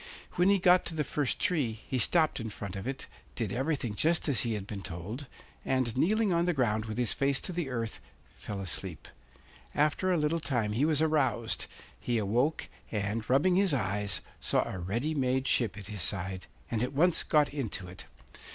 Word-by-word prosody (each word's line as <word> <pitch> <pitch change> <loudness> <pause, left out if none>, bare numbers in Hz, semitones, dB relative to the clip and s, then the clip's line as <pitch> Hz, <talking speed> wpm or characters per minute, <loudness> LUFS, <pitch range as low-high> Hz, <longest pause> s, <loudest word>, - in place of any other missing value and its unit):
When 180 +2 +3
he 200 - +5
got 180 -1 +5
to 165 - -2
the 155 - +1
first 145 -2 -1
tree 150 - +1
he 130 - 0
stopped 155 +6 +3
in 115 -1 -4
front 100 -2 -6
of 95 +5 -5
it, 135 0 -4 0.3
did 110 -5 -2
everything 135 -3 -1
just 160 +11 +2
as 140 -4 +3
he 115 -2 0
had 100 -2 -4
been 100 -1 -6
told, 100 - -6 0.4
and, 130 -3 0
kneeling 205 - +2
on 170 0 +2
the 175 - +2
ground 110 -5 +1
with 110 0 -5
his 120 -3 +2
face 140 -1 +1
to - - -3
the 170 -5 -2
earth, 115 -3 -3 0.3
fell 100 -1 -6
asleep. 90 -2 -5 0.7
After 155 +5 +2
a 180 - +3
little 155 +2 +1
time 120 -8 0
he 120 +7 +2
was 155 -1 +3
aroused; 130 -7 +1 0.3
he 120 -1 0
awoke 120 +9 +1 0.2
and, 105 +1 -2
rubbing 155 +8 +4
his 190 -6 +3
eyes, 105 -3 -1 0.2
saw - - +1
a 95 - -5
ready 115 - -1
made 130 -2 +1
ship 110 -7 +2
at 105 - -8
his 105 -1 -5
side, 95 0 -2 0.2
and 115 -2 0
at 125 +3 -1
once 170 +5 +3
got 150 -2 +2
into 115 -9 -3
it. 90 +1 -10
125 Hz, 195 wpm, -30 LUFS, 105-155 Hz, 0.7 s, he